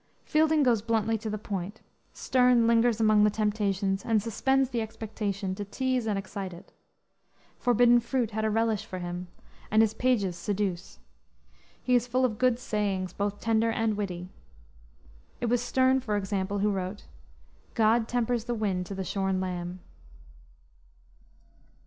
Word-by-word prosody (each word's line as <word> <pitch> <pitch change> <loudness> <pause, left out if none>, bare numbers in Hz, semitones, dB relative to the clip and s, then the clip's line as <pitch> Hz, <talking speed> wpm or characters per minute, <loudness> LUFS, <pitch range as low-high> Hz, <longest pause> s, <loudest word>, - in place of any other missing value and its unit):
Fielding 310 -1 +3
goes 235 -5 +3
bluntly 225 0 0
to 220 0 -4
the 215 - -2
point; 200 0 -5 0.3
Sterne 250 -2 +3
lingers 230 0 +3
among 215 -1 +4
the 210 - +5
temptations 200 -2 -1
and 225 -2 +2
suspends 265 +5 +1
the 235 -2 -1
expectation 210 -3 -4
to 205 - -5
tease 255 +3 -1
and 210 -2 0
excite 195 -1 -5
it. 170 - -13 0.9
Forbidden 240 0 +5
fruit 240 -1 -1
had 220 +1 -2
a 220 - +2
relish 225 -1 +1
for 185 - -7
him, 175 0 -5 0.4
and 220 +1 +5
his 220 -1 +1
pages 220 -7 +1
seduce. 190 0 -3 0.9
He 250 - +1
is 245 -1 +3
full 255 +1 +2
of 220 -3 -2
good 255 -2 +3
sayings, 200 -6 -2
both 205 0 -2
tender 225 0 +1
and 225 -1 0
witty. 180 -3 -4 1.1
It 240 - -1
was 245 0 +2
Sterne, 260 +2 +2
for 215 -5 -2
example, 195 0 -2
who 205 +1 +1
wrote, 190 +1 -4 0.7
"God 225 0 +3
tempers 240 -1 -1
the 240 -1 -2
wind 190 -5 -1
to 195 - -6
the 190 - -3
shorn 190 0 -1
lamb." 180 -1 -4
215 Hz, 155 wpm, -28 LUFS, 195-235 Hz, 1.1 s, the